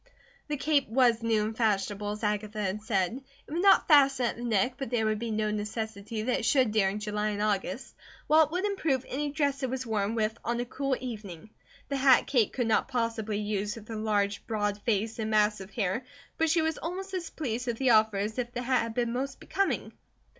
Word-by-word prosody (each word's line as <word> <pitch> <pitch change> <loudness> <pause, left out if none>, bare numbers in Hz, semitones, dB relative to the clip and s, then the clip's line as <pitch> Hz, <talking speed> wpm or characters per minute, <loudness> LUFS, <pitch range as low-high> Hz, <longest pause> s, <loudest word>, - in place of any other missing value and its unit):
The 295 -1 -2
cape 285 -3 +1
was 240 -1 +3
new 225 -2 +2
and 220 +1 -3
fashionable 205 -2 0
as 210 +2 -5
Agatha 210 +1 -1
had 205 +1 -2
said; 215 +2 -1 0.2
it - - -15
would 340 - 0
not 395 0 +5
fasten 275 -4 +5
at 235 - -1
the 240 - -8
neck, 230 +1 +1
but 270 -4 -4
there 230 -2 +1
would 215 -1 0
be 235 0 -3
no 215 -1 0
necessity 215 0 -4
that 250 +2 0
it - - -5
should 255 -2 +3
during 205 -2 +2
July 210 0 -2
and 205 -1 -3
August, 205 +2 -2 0.3
while 315 +1 +6
it 300 - -14
would 365 +4 -1
improve 320 -11 0
any 290 +3 -2
dress 285 -2 0
it 260 - -1
was 260 0 -3
worn 215 -1 -1
with 220 0 0
on 235 0 -1
a 245 - -1
cool 275 +2 -1
evening. 210 -6 -7 0.4
The 280 - -1
hat 265 -1 +5
Kate 240 -7 +2
could 245 - -1
not 225 - +2
possibly 230 -4 -2
use 210 +1 -2
with 225 -1 -12
her 225 - -4
large, 205 -2 0
broad 205 -2 -1
face 225 0 -1
and 220 -1 -2
mass 210 -1 +2
of 190 - -9
hair, 200 +3 -1 0.4
but 325 0 +3
she 325 0 +3
was 320 0 -1
almost 380 +4 -5
as 350 -3 -3
pleased 250 -4 -4
with 235 -1 -1
the 260 -1 +3
offer 220 -2 +4
as 215 +4 -2
if 240 -1 -2
the 245 - -3
hat 255 +1 +2
had 230 -1 -4
been 235 -1 0
most 270 +2 -3
becoming. 395 0 -1
225 Hz, 225 wpm, -29 LUFS, 210-265 Hz, 0.4 s, while